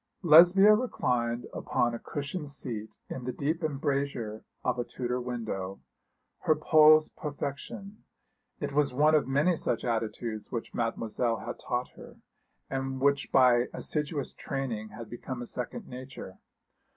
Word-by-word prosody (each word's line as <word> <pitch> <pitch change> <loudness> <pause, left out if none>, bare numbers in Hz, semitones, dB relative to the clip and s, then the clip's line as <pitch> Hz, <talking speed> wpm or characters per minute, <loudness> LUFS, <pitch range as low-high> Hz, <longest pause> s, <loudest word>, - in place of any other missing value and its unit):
Lesbia 180 +6 +8
reclined 125 - 0
upon 120 -1 0
a 115 - -4
cushioned 145 +2 -5
seat 115 -6 -5
in 130 - -6
the 125 - -1
deep 155 +6 -2
embrasure 140 -7 -2 0.2
of 125 0 0
a - - +1
Tudor 125 +1 -3
window, 110 -6 -4 0.6
her 155 - +3
pose 155 0 +6
perfection 150 +8 -6 0.6
it 145 -1 -3
was 145 -3 +2
one 150 +3 +4
of 150 -4 +3
many 145 +7 +3
such 120 -6 -2
attitudes 115 -1 -3
which 115 -2 -4
Mademoiselle 115 0 -1
had - - -5
taught 125 +1 -2
her, - - -13 0.5
and 135 0 -3
which 140 +1 +2
by 125 -2 +5
assiduous 150 -2 -3
training 120 -6 -4
had 115 +1 -9
become 120 +2 -6
a 120 - -5
second 180 - -5
nature. 125 -7 -9
130 Hz, 140 wpm, -29 LUFS, 120-150 Hz, 0.6 s, Lesbia